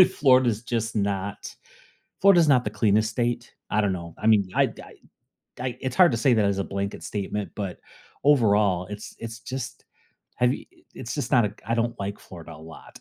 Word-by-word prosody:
Florida 130 -3 +5
is 110 0 -3
just 115 -1 -2
not, 100 0 -3 0.7
Florida 195 -3 +7
is 165 - +4
not 130 -4 +4
the 105 - -2
cleanest 105 +1 +2
state. 120 +1 -2 0.2
I 105 - +2
don't 100 -2 +1
know. 85 -2 -7
I 110 - -1
mean, 105 -3 +4
I - - +3
I - - -14 0.7
I, 125 -1 -3
it's 130 -1 -3
hard 180 -4 +6
to 115 - 0
say 120 +1 +3
that 105 - +3
as 100 -1 0
a - - 0
blanket 100 0 -4
statement, 105 0 -4
but 95 -4 -5 0.4
overall, 105 -9 +3
it's 105 +1 -8
it's 115 0 -7
just, 130 0 -6 0.5
have 125 +1 +2
you - - -8
i - - -25
it's - - -6
just - - -3
not 120 - +5
a 105 - -4
I 115 - 0
don't 115 0 -1
like 100 +1 -4
Florida 85 -2 -11
a 75 - -13
lot. 80 0 -13
110 Hz, 210 wpm, -25 LUFS, 100-120 Hz, 0.7 s, Florida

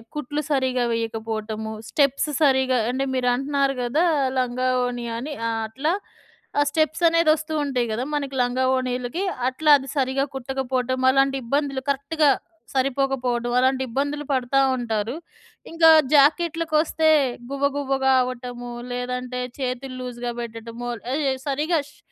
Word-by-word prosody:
కుట్లు 300 +1 -3
సరిగ్గా 260 -2 +1
వేయకపోవటము, 220 -1 -3 0.2
స్టెప్స్ 280 +1 +2
సరిగ్గా 265 -2 +3
అంటే 270 +2 -1
మీరంటున్నారు 270 +2 +1
గదా 300 +9 +1 0.3
లంగావోణి 250 -1 0
అని 290 +4 -5 0.3
అట్లా 275 +9 -1 0.7
ఆ! - - +5
స్టెప్‌సనేది 325 +1 +2
వస్తు 310 0 -4
ఉంటాయి 250 -4 -1
గదా! 235 +4 -1
మనకి 280 -2 -2
లంగావోణీలకి. 255 +3 0 0.3
అట్లా 300 +4 +2
అది 270 0 -9
సరిగ్గా 265 +1 +1
కుట్టకపోవటం. 260 -1 -2
అలాంటి 270 0 +3
ఇబ్బందులు 275 +1 -1
కరెక్ట్‌గా 280 +2 +2 0.4
సరిపోకపోవడం 255 -3 0
అలాంటి 260 +1 +2
ఇబ్బందులు 285 +4 -2
పడతా 260 +1 +1 0.2
ఉంటారు. 230 0 -2 0.6
ఇంకా 330 -1 +5 0.2
జాకెట్లుకొస్తే 315 +1 +3 0.4
గువ్వ 280 0 -1
గువ్వగా 270 -1 +1
అవ్వటము, 245 -1 -6 0.2
లేదంటే 250 0 -3 0.2
చేతులు 255 0 -3
లూజ్‌గా 245 -1 -4
పెట్టడము 230 +1 -6 0.3
ఆహ్, 305 - 0
యె 265 - +2
సరిగ్గా 305 +4 +1
షే - - -24
265 Hz, 115 wpm, -23 LUFS, 245-285 Hz, 0.7 s, ఆ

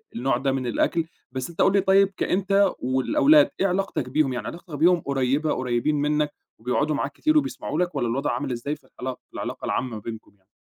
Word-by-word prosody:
النوع 120 +1 +1
ده 135 +1 0
من 130 -2 -2
الأكْل. 165 +7 +1 0.3
بس 130 +2 -4
أنت 170 - -3
قُل 195 - +4
لي 200 - +4
طيب 195 +1 +4
كأنت 195 0 +2
والأولاد، 290 - +4
إيه 195 - +3
علاقتك 180 -8 -1
بيهم، 135 -1 +1
يعني 120 - -4
علاقتك 170 -2 -8
بيهم 170 +4 +4
قريّبة، 140 +2 0
قريّبين 125 +4 0
منك 150 0 0 0.3
وبيقعُدوا 145 +6 0
معاك - - -2
كتير 310 0 +1
وبيسمَعوا 275 - -1
لك 180 0 -1
والّا 120 - 0
الوضْع 135 +5 -1
عامِل 145 -2 -3
إزاي 125 +5 -3
في 155 - -23
العلاقة، 130 0 -4
العلاقة - - -5
العامة 125 -4 -2
بينكم 110 0 -8
يعني؟ 95 -1 -40
145 Hz, 200 wpm, -24 LUFS, 130-180 Hz, 0.3 s, قُل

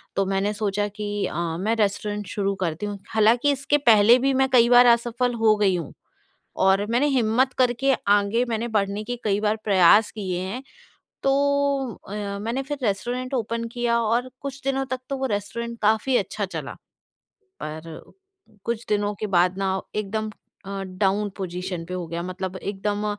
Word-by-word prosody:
तो 195 - +1
मैंने 195 +2 0
सोचा 205 -1 -1
कि 205 0 -3
अ, 165 0 -3
मैं 215 +6 0
रेस्टोरेंट 205 -1 -1
शुरू 200 0 -1
करती 165 +4 -3
हूँ, 205 -1 -5
हालाँकि 230 +6 +4
इसके 280 +1 +1
पहले 230 -3 +6
भी 270 +1 +2
मैं 265 0 +2
कई 240 -2 +5
बार 245 0 +8
असफल 240 +1 -2
हो 215 -1 +6
गई 200 -3 +3
हूँ 170 -5 -5 0.7
और 190 +1 +4
मैंने 245 +5 +2
हिम्मत 255 +1 +2
करके 255 +2 +2 0.2
आगे 205 +4 +1
मैंने 230 +1 -1
बढ़ने 200 +1 0
के 245 +2 -4
कई 205 -2 +1
बार 215 0 +2
प्रयास 205 +1 +5
किए 185 -4 -3
हैं। 190 +8 -4 0.6
तो 270 - +3 0.8
अ, 200 - -7 0.3
मैंने 235 +5 -2
फिर 290 +1 -4
रेस्टोरेंट 245 +6 -2
ओपन 230 -1 -1
किया 240 -1 +1
और 235 +3 0
कुछ 275 0 -6
दिनों 270 0 0
तक 260 -1 -4
तो 275 - -2
वो 265 - -2
रेस्टोरेंट 235 +4 -5
काफ़ी 220 +5 +3
अच्छा 205 +1 -2
चला। 190 - -6 0.9
पर 160 +1 -7 0.6
कुछ 235 0 -2
दिनों 205 0 0
के 215 - -1
बाद 180 +2 +3
ना 190 -1 0 0.2
एकदम 215 +1 -2 0.4
अ, 195 0 -4
डाउन 195 +2 0
पोज़ीशन 180 -2 -4
पे 180 - -6
हो 180 -2 -4
गया 170 +1 -4
मतलब 185 +1 -5
एकदम 205 +2 -3
210 Hz, 170 wpm, -24 LUFS, 195-240 Hz, 0.9 s, बार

